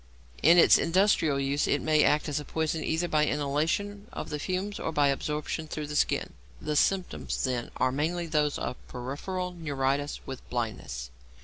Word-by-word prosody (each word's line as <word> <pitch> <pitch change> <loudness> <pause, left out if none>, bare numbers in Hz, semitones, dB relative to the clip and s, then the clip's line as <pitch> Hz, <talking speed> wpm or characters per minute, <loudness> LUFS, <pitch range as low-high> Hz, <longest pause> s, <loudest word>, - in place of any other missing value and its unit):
In 170 +4 +7
its 170 - +7
industrial 165 -5 +3
use 140 +1 0
it - - +2
may 155 -1 +3
act 150 +1 +3
as 150 0 -1
a - - -6
poison 160 +1 -2
either 165 +2 0
by 155 -2 +2
inhalation 160 +9 -1
of - - -6
the 150 - -2
fumes 185 +5 -3
or - - -2
by 145 -2 +3
absorption 150 +3 -2
through 155 0 -4
the 150 0 -6
skin. - - +1 0.3
The 150 - -3
symptoms 185 +4 0
then 125 -3 -1
are 130 - +2
mainly 165 +6 -1
those 150 -3 +1
of - - -4
peripheral 165 +9 -4
neuritis 145 -3 -1
with 130 -1 -6
blindness. 110 - -4
150 Hz, 175 wpm, -28 LUFS, 140-170 Hz, 0.3 s, In